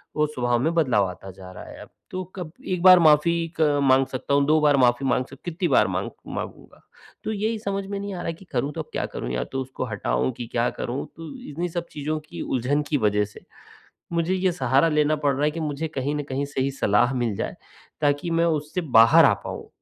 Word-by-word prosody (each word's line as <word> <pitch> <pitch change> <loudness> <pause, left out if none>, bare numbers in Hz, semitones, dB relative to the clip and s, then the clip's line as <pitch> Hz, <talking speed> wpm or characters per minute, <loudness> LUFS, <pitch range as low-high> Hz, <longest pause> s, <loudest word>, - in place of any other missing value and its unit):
वो 150 - +3
स्वभाव 120 -5 0
में 160 +7 +1
बदलाव 125 - +3
आता 90 +2 -10
जा 95 0 -12
रहा 90 - -10
है - - -11
अब। - - -12 0.2
तो 185 0 -3
कब 175 -5 -6 0.2
1 180 -2 -1
बार 185 -1 +9
माफ़ी 155 0 +5
एक 165 -1 -6 0.2
माँग 135 0 +4
सकता 130 +2 -3
हूँ, 140 0 +4
2 155 +2 +4
बार 145 -2 +4
माफ़ी 125 +1 +3
माँग 125 0 +1
सक 135 - -13
कितनी 175 +1 -1
बार - - +4
माँग - - -2 0.2
माँगूँगा? - - -7 0.4
तो - - -2
यही 220 +1 -1
समझ 200 -2 -3
में 200 0 -4
नहीं 200 0 -5
आ 175 - -5
रहा 165 - -2
कि 165 +4 -13
करूँ 135 +2 -1
तो - - -2
अब - - -11
क्या - - -1
करूँ? - - -6
या 60 - -1
तो 135 - -4
उसको 130 0 -5
हटाऊँ 65 - -1
कि 120 - -5
क्या 120 0 +2
करूँ? 125 +3 -3
तो 165 -1 -8 0.2
इन्ही 170 +4 -3
सब 170 0 -4
चीज़ों 155 +1 -3
की - - -7
उलझन 135 +4 0
की 150 - +2
वज़ह 105 -3 +2
से 105 - -14 0.7
मुझे 170 +2 +1
ये 185 -1 +1
सहारा 135 0 +2
लेना 150 0 +2
पड़ 145 -2 +1
रहा 140 +3 0
है 150 - +3
कि 165 +2 -6
मुझे 155 0 -3
कहीं 145 -1 -2
न 145 - -2
कहीं 135 +2 -1
सही 140 -1 -1
सलाह 120 0 +2
मिल 120 -4 -1
जाए - - -4 0.5
ताकि 145 +3 +1
मैं 165 0 +2
उससे 155 +2 -1 0.2
बाहर 115 0 +8
आ - - +6
पाऊँ। - - -7
145 Hz, 235 wpm, -24 LUFS, 125-165 Hz, 0.7 s, बार